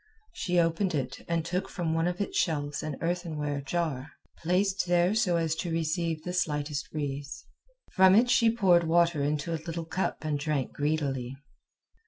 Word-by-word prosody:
She 180 -1 -1
opened 170 +2 +1
it 135 -1 -3
and 165 -1 -1
took 180 +2 -2
from 170 -3 -2
one 165 +1 +1
of 180 0 -2
its 200 - -3
shelves 145 -3 0
an 155 -3 -4
earthenware 155 -5 -2
jar, 145 -2 -2 0.3
placed 190 +3 +1
there 175 +2 +3
so 215 -6 +2
as 165 -2 0
to 175 - -3
receive 165 0 -1
the 180 - -4
slightest 150 -4 -2
breeze. 140 -2 -5 0.5
From 190 0 +6
it 235 +4 +5
she 235 -1 +4
poured 185 -7 +4
water 170 -2 +3
into 150 +3 -1
a 160 - -3
little 165 0 -4
cup 180 -1 -3
and 150 -2 -1
drank 145 -3 -2
greedily. 140 -4 -2
165 Hz, 170 wpm, -28 LUFS, 150-180 Hz, 0.5 s, From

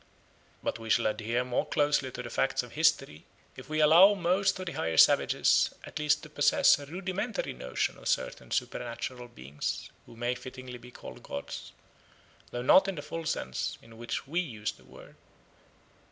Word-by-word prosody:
But - - -2
we 115 0 -8
shall 115 - +3
adhere 115 +3 0
more 125 -1 0
closely 145 -2 +1
to 125 - -6
the 120 - -8
facts 135 - 0
of 120 - -11
history 150 - +1 0.3
if - - -11
we 155 0 -1
allow 175 +7 +7
most 190 +2 +1
of 185 - -5
the 175 - -4
higher 80 0 -2
savages - - +4
at - - -7
least 150 -1 +2
to 155 - -10
possess 145 -1 +4
a 145 - -9
rudimentary 190 +6 -3
notion 65 0 -3
of - - -8
certain - - -2
supernatural 120 +1 -3
beings 70 - -5 0.2
who - - -14
may 120 +2 -1
fittingly 130 0 -9
be 120 - -13
called - - -11
gods, 70 - -7 0.8
though 120 0 -4
not 190 +9 +6
in 195 - -2
the 150 - -6
full 165 0 -6
sense 65 - -3
in 115 0 -16
which 120 +3 -4
we 160 +6 -1
use 110 - -3
the 100 - -20
word. - - -15
130 Hz, 180 wpm, -29 LUFS, 115-160 Hz, 0.8 s, allow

